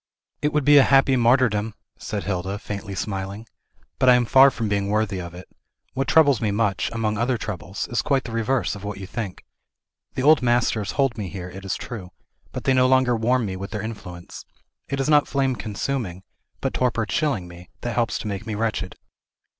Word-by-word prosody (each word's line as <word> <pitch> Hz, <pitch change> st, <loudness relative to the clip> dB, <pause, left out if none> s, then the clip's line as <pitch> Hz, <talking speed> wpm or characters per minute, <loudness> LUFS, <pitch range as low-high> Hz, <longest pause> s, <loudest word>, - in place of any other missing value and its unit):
"It 150 Hz, -, +1 dB
would 150 Hz, -2 st, 0 dB
be 145 Hz, 0 st, +8 dB
a -, -, +7 dB
happy 135 Hz, 0 st, +4 dB
martyrdom!" 115 Hz, -3 st, +2 dB, 0.2 s
said 105 Hz, -2 st, -4 dB
Hilda, 95 Hz, 0 st, -2 dB
faintly 100 Hz, -1 st, -6 dB
smiling. 100 Hz, +2 st, -4 dB, 0.5 s
"But 130 Hz, -1 st, +5 dB
I 125 Hz, -, +8 dB
am 120 Hz, -1 st, +2 dB
far 135 Hz, +4 st, +7 dB
from 115 Hz, -4 st, -3 dB
being 100 Hz, -1 st, 0 dB
worthy 105 Hz, -3 st, 0 dB
of 85 Hz, 0 st, -8 dB
it. 90 Hz, -, -10 dB, 0.5 s
What 135 Hz, +1 st, -1 dB
troubles 145 Hz, -7 st, +5 dB
me 110 Hz, -, +1 dB
much, 100 Hz, -3 st, 0 dB
among 110 Hz, -2 st, -1 dB
other 120 Hz, +1 st, +1 dB
troubles, 95 Hz, -4 st, -5 dB
is 120 Hz, -2 st, 0 dB
quite 135 Hz, -2 st, +1 dB
the 115 Hz, -, -7 dB
reverse 115 Hz, -2 st, 0 dB
of 100 Hz, 0 st, -9 dB
what 105 Hz, -1 st, -5 dB
you 95 Hz, -, -7 dB
think. 100 Hz, -2 st, -6 dB, 0.7 s
The 130 Hz, -, -1 dB
old 155 Hz, 0 st, +6 dB
masters 120 Hz, -4 st, +1 dB
hold 135 Hz, -5 st, 0 dB
me 100 Hz, -3 st, -4 dB
here, 90 Hz, -1 st, -7 dB
it 95 Hz, +1 st, -10 dB
is 95 Hz, -, -1 dB
true, 105 Hz, -7 st, -7 dB, 0.4 s
but -, -, -6 dB
they 135 Hz, -, +3 dB
no 130 Hz, 0 st, +4 dB
longer 130 Hz, -2 st, +3 dB
warm 120 Hz, +2 st, +1 dB
me 95 Hz, -2 st, -4 dB
with 100 Hz, +1 st, -6 dB
their 105 Hz, -2 st, -4 dB
influence. 90 Hz, -6 st, -8 dB, 0.5 s
It 140 Hz, -, -2 dB
is 135 Hz, -, 0 dB
not 150 Hz, -1 st, +4 dB
flame 135 Hz, -2 st, 0 dB
consuming, 105 Hz, -4 st, -4 dB, 0.4 s
but -, -, -1 dB
torpor 120 Hz, -3 st, 0 dB
chilling 115 Hz, -, -1 dB
me, 85 Hz, 0 st, -13 dB
that 120 Hz, -, -3 dB
helps 120 Hz, -1 st, 0 dB
to -, -, -6 dB
make 100 Hz, +1 st, -5 dB
me 110 Hz, -, -3 dB
wretched." 105 Hz, -4 st, -2 dB
110 Hz, 205 wpm, -23 LUFS, 100-130 Hz, 0.7 s, be